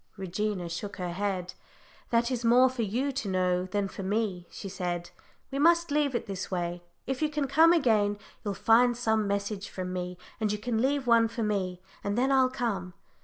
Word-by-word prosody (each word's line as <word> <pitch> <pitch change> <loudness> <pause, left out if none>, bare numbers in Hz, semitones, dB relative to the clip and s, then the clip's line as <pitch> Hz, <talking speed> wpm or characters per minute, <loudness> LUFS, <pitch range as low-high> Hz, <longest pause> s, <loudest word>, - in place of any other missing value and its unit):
Regina 190 0 -2
shook 170 +5 -5
her 180 -1 -3
head. 185 -1 -2 0.6
"That 235 +1 +2
is 245 -2 -2
more 245 +3 +6
for 255 -2 -3
you 240 +7 0
to 235 -6 -3
know 180 -1 +1
than 200 +1 -1
for 195 - -8
me," 195 -2 -1
she - - -8
said. 175 -2 -4 0.4
"We 275 - -2
must 335 +1 +4
leave 290 -3 +1
it - - -1
this 195 -3 -5
way 175 -1 -2 0.2
if 265 +1 -3
you 310 - +2
can 295 -1 -1
come 320 +5 +6
again, 220 -10 +3 0.3
you'll 205 -2 -2
find 240 +3 +4
some 220 -3 +1
message 200 0 -2
from 185 -1 -5
me, 180 0 -4 0.2
and 215 -2 +1
you 210 - -1
can 225 +1 -1
leave 275 +1 +1
one 230 -1 +5
for 230 0 -4
me, 185 -4 -2 0.2
and 205 +2 -1
then 260 +3 +2
I'll 260 -1 +4
come." 200 -9 -3
210 Hz, 200 wpm, -29 LUFS, 185-250 Hz, 0.6 s, more